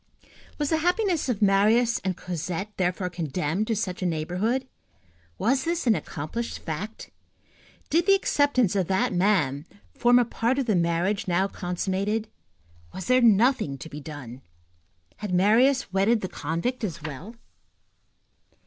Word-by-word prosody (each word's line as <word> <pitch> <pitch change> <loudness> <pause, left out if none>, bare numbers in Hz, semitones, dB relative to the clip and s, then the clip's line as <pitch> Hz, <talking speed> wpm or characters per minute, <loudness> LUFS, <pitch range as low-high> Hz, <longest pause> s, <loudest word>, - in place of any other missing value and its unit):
Was 295 0 -1
the 320 - +3
happiness 355 -2 +1
of 220 -3 0
Marius 215 +4 +3
and 185 -2 -2
Cosette 180 +4 -5
thenceforth 180 0 -1
condemned 170 +3 -2
to 225 - 0
such 190 -4 -3
a 185 - +1
neighborhood? 180 +11 -1 0.7
Was 260 - +1
this 340 -1 -1
an 230 - +5
accomplished 210 +7 -4
fact? 185 +8 -6 0.8
Did 335 +2 +2
the 395 - +7
acceptance 285 - +2
of 190 -4 +1
that 190 0 +1
man 175 -6 +1 0.3
form 245 +1 +4
a 245 - +4
part 235 +3 -1
of 275 - 0
the 215 -4 +1
marriage 175 +5 0
now 185 +2 +2
consummated? 195 +4 -2 0.7
Was 190 - -5
there 255 +4 +4
nothing 225 - +3
to 160 - -9
be 150 - -8
done? 135 -4 -9 0.8
Had 205 -4 -3
Marius 225 +5 +3
wedded 205 +4 +3
the 185 - -2
convict 170 - -3
as 170 -6 -4
well? 160 - -7
200 Hz, 145 wpm, -26 LUFS, 175-240 Hz, 0.8 s, the